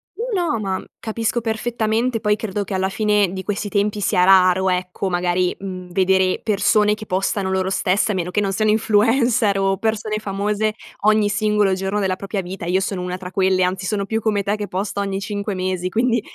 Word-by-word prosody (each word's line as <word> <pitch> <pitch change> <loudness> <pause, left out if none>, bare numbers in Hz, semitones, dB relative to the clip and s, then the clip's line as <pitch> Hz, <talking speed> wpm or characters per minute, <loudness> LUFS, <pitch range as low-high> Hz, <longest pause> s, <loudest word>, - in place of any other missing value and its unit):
No, 430 -7 -1
no 230 - -1
ma 190 -3 -3
capisco 225 +2 -2
perfettamente. 225 +1 -1
Poi 210 -1 +2
credo 210 -1 -3
che 200 - -6
alla 190 0 0
fine 210 -2 +1
di 190 0 -5
questi 205 +1 -3
tempi 205 +1 0
sia 185 -2 +2
raro 185 0 +5
ecco 180 +1 -2
magari, 180 0 0
mhmm, 185 -2 -7
vedere 190 0 +2
persone 210 0 +3
che 215 - -9
postano 190 0 -1
loro 190 0 0
stesse, 195 +2 +1
a - - -2
meno 180 -1 -2
che 195 +3 0
non 195 -1 0
siano 215 +2 +2
influencer 225 0 +2
o 195 0 +1
persone 220 0 -1
famose 210 +1 -1 0.3
ogni 215 0 +3
singolo 210 -1 +2
giorno 190 +2 -1
della 190 -2 0
propria 200 0 -3
vita, 180 -1 -7
io 180 +2 +1
sono 195 -1 -2
una 180 0 -4
tra 180 -1 -8
quelle. 185 -1 +2
Anzi 185 +1 -1
sono 200 +1 -1
più 220 +2 -1
come 210 -2 0
te 200 +2 0
che 205 -1 -4
posto 195 +2 -3
ogni 195 -1 -2
5 205 0 -3
mesi 185 -1 -2
quindi 235 +4 +1
200 Hz, 200 wpm, -20 LUFS, 185-215 Hz, 0.3 s, raro